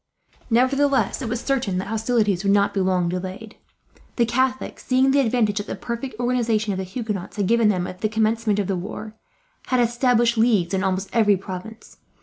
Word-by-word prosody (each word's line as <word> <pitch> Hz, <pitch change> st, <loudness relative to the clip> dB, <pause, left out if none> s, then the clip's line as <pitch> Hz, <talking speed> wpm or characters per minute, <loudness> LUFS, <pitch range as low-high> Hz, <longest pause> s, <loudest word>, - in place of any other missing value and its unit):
Nevertheless, 270 Hz, +4 st, +2 dB
it 240 Hz, -, -3 dB
was 240 Hz, +1 st, -2 dB
certain 250 Hz, -9 st, -1 dB
that 190 Hz, +2 st, -4 dB
hostilities 220 Hz, -4 st, 0 dB
would 195 Hz, -, +2 dB
not 200 Hz, 0 st, +3 dB
be 200 Hz, -, -1 dB
long 185 Hz, -2 st, +1 dB
delayed. 185 Hz, +5 st, -5 dB, 0.6 s
The 235 Hz, -, +3 dB
Catholics, 260 Hz, +2 st, -1 dB
seeing 260 Hz, +1 st, +3 dB
the 280 Hz, -, +3 dB
advantage 225 Hz, -5 st, +1 dB
that 205 Hz, -, -6 dB
the -, -, -4 dB
perfect 235 Hz, -1 st, -6 dB
organization 230 Hz, -4 st, 0 dB
of -, -, -4 dB
the 190 Hz, -, -2 dB
Huguenots 205 Hz, -2 st, -5 dB
had 200 Hz, -, +1 dB
given 230 Hz, +1 st, +3 dB
them 180 Hz, -3 st, 0 dB
at 185 Hz, 0 st, -8 dB
the 215 Hz, -, +1 dB
commencement 220 Hz, -1 st, +1 dB
of 205 Hz, -, 0 dB
the 195 Hz, -, -1 dB
war, 210 Hz, +4 st, -6 dB, 0.5 s
had 255 Hz, -, +1 dB
established 240 Hz, -1 st, +2 dB
leagues 210 Hz, -7 st, +2 dB
in 190 Hz, 0 st, 0 dB
almost 190 Hz, 0 st, -1 dB
every 210 Hz, -4 st, +4 dB
province. 195 Hz, +4 st, -9 dB
220 Hz, 190 wpm, -22 LUFS, 195-240 Hz, 0.6 s, every